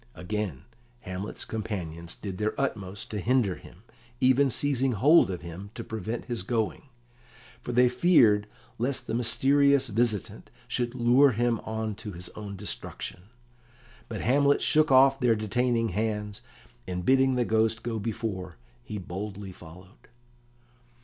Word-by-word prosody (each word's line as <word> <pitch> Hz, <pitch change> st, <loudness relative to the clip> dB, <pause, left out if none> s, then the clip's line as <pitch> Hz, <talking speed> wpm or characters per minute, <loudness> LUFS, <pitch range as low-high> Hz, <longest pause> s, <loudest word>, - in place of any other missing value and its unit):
Again 90 Hz, -6 st, -4 dB, 0.4 s
Hamlet's 95 Hz, +1 st, -6 dB
companions 85 Hz, -7 st, -5 dB
did 95 Hz, -3 st, -7 dB
their 110 Hz, 0 st, -1 dB
utmost 100 Hz, -7 st, -3 dB
to 105 Hz, -, -3 dB
hinder 115 Hz, -2 st, +2 dB
him, 90 Hz, +5 st, -16 dB, 0.4 s
even 130 Hz, +2 st, +4 dB
seizing 135 Hz, 0 st, +1 dB
hold 145 Hz, -, +5 dB
of 90 Hz, -2 st, -4 dB
him 85 Hz, +4 st, -8 dB
to 115 Hz, -, -5 dB
prevent 110 Hz, +1 st, -5 dB
his 120 Hz, -5 st, -3 dB
going, 110 Hz, +5 st, -2 dB, 0.8 s
for 120 Hz, -, -5 dB
they 125 Hz, +1 st, +5 dB
feared 120 Hz, -, +4 dB, 0.3 s
lest 130 Hz, +3 st, -1 dB
the -, -, -4 dB
mysterious 135 Hz, +3 st, +3 dB
visitant 110 Hz, -2 st, -1 dB, 0.2 s
should 120 Hz, 0 st, -1 dB
lure 125 Hz, +3 st, +5 dB
him 120 Hz, 0 st, +1 dB
on 110 Hz, 0 st, -3 dB
to 105 Hz, -3 st, -7 dB
his 90 Hz, +1 st, -7 dB
own 105 Hz, -2 st, -8 dB
destruction. 95 Hz, -2 st, -5 dB, 0.8 s
But 110 Hz, -, -4 dB
Hamlet 140 Hz, +3 st, +3 dB
shook 155 Hz, -1 st, +3 dB
off 135 Hz, +1 st, +6 dB
their 120 Hz, -3 st, +3 dB
detaining 115 Hz, +2 st, 0 dB
hands, 105 Hz, +1 st, -3 dB, 0.5 s
and, 90 Hz, -1 st, -4 dB
bidding 130 Hz, 0 st, +4 dB
the 125 Hz, -1 st, +1 dB
Ghost 110 Hz, 0 st, +1 dB
go 115 Hz, -2 st, -3 dB
before, 100 Hz, -5 st, -4 dB, 0.3 s
he 105 Hz, -, -6 dB
boldly 95 Hz, +1 st, -6 dB
followed. 90 Hz, +2 st, -15 dB
110 Hz, 140 wpm, -27 LUFS, 100-125 Hz, 0.8 s, off